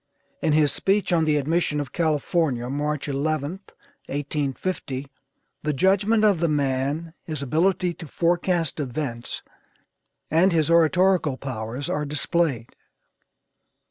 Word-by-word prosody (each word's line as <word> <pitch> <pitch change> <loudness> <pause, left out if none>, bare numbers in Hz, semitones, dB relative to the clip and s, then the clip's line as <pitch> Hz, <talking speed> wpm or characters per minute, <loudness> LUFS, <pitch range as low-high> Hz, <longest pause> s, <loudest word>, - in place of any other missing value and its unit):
In 155 - +2
his 150 -2 +4
speech 195 -1 +1
on 165 -2 +3
the 150 -1 +3
admission 150 +1 0
of 140 -4 -4
California, 155 -5 0
March 150 +1 -2
11th, 155 +5 -2 0.4
1850, 145 0 -3 0.6
the 150 0 -1
judgment 200 - +3
of 200 -5 +4
the 170 - +2
man, 145 +2 -1
his 155 -4 -5
ability 175 +5 +1
to 165 -1 -10
forecast 170 0 0
events, 125 -3 -4 0.9
and 170 +5 +4
his 160 -1 +2
oratorical 170 -2 +3
powers 125 +1 -5
are 150 - -1
displayed. 145 -4 -1
155 Hz, 115 wpm, -24 LUFS, 140-170 Hz, 0.9 s, his